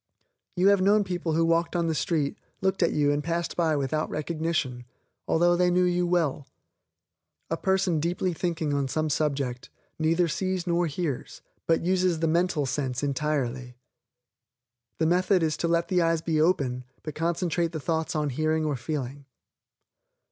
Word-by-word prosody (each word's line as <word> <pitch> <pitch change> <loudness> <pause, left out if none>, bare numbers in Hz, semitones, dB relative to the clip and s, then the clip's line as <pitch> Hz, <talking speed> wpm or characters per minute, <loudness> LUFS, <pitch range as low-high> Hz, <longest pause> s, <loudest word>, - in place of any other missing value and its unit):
You 185 +2 +4
have 200 -2 +4
known 205 +2 +4
people 175 -4 -2
who 165 +1 +3
walked 165 +1 +1
on 170 -1 +1
the 165 - 0
street, 155 -3 0 0.2
looked 190 0 0
at 170 - +3
you 145 -1 +2
and 145 0 -1
passed 170 +2 -2
by 165 -3 +2
without 145 +2 -1
recognition, 155 -5 -2 0.4
although 175 +1 +3
they 180 0 +3
knew 180 +1 +3
you 180 0 +1
well. 160 -5 0 1.0
A - - +2
person 190 -3 +1
deeply 175 +3 -1
thinking 160 -3 -2
on 140 -1 0
some 155 +3 -1
subject, 135 -4 -1 0.3
neither 165 +2 +2
sees 185 +2 -2
nor 175 0 +1
hears, 150 -3 -4 0.2
but 165 0 +2
uses 185 -1 +2
the 165 - +1
mental 170 -2 +1
sense 130 -1 -2
entirely. 135 -4 -2 1.2
The 160 - +1
method 180 +2 +3
is 155 -2 +1
to 170 - -1
let 170 0 +1
the 180 -2 +2
eyes 165 -1 +2
be 155 -2 +1
open, 135 -7 +1 0.2
but 155 - -5
concentrate 170 0 0
the 160 - -4
thoughts 160 +2 -2
on 150 -2 0
hearing 155 +3 0
or 150 -2 0
feeling. 140 +1 -5
165 Hz, 165 wpm, -27 LUFS, 150-175 Hz, 1.2 s, You